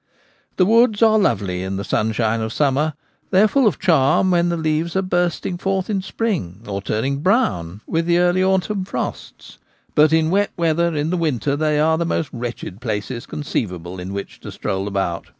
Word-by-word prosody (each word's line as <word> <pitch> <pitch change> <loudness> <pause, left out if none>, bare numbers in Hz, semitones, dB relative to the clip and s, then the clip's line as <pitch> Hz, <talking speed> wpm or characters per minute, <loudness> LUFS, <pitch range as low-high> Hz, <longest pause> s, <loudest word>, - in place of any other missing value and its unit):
The 185 - +4
woods 225 +1 +4
are 220 -1 +5
lovely 100 - 0
in 95 +1 -3
the 100 - -3
sunshine 110 +2 0
of 110 0 -3
summer; 145 +3 +1 0.3
they 190 +1 +5
are - - +6
full 265 +1 +3
of 210 - +1
charm 165 +1 +3
when 175 -1 +2
the 170 - -1
leaves 160 +2 -1
are 190 - +1
bursting 175 -1 -1
forth 195 +1 -1
in 195 -2 0
spring 180 - -3
or 100 -1 -3
turning 130 +8 -1
brown 105 - 0
witji 165 0 0
the 170 0 +3
early 180 +1 +3
autumn 190 +1 +1
frosts; 185 - -6 0.3
but 155 0 +5
in 160 0 +2
wet 205 +2 +2
weather 170 0 +1
in 150 +2 -1
the 180 - 0
winter 145 -4 0
they 150 0 +1
are 160 +1 +2
the 170 - 0
most 165 -2 -1
wretched 120 -4 -6
places 115 +1 -4
conceivable 90 - -4
in 90 +2 -6
which 100 0 -6
to - - -9
stroll 95 0 -3
about. 95 -4 -2
155 Hz, 190 wpm, -20 LUFS, 110-185 Hz, 0.3 s, are